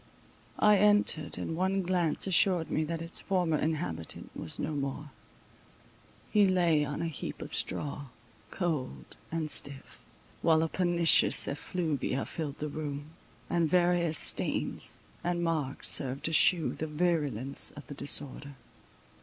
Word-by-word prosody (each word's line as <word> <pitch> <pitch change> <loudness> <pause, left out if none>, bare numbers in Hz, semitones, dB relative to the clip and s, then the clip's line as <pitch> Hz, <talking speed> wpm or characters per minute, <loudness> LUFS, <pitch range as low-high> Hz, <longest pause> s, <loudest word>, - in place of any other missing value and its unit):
I 210 -1 +5
entered, 205 -6 +2
and 165 - -3
one 190 +2 0
glance 175 -3 +1
assured 180 -2 +3
me 155 - +1
that 165 +1 -4
its 165 - 0
former 175 -5 +1
inhabitant 90 - -3
was 80 - -4
no - - -2
more—he 145 +7 -4
lay 170 -5 +3
on 145 +3 -3
a - - -1
heap 160 - -6
of - - -8
straw, 145 0 -2 0.4
cold 135 - -3 0.2
and 160 -2 -2
stiff; 140 -1 -3 0.4
while 160 -1 +4
a 165 - -1
pernicious 175 -2 +3
effluvia 145 -3 -2
filled 150 -4 -5
the 150 - -3
room, 145 0 -5 0.4
and 170 -2 +1
various 175 -2 +2
stains - - -1 0.3
and 175 0 -1
marks 155 -5 -2
served 135 0 -1
to 165 - -1
shew 165 +1 +4
the 160 - -4
virulence 150 -6 0
of 145 - -11
the - - -8
disorder. 140 0 0
160 Hz, 135 wpm, -30 LUFS, 145-175 Hz, 0.4 s, I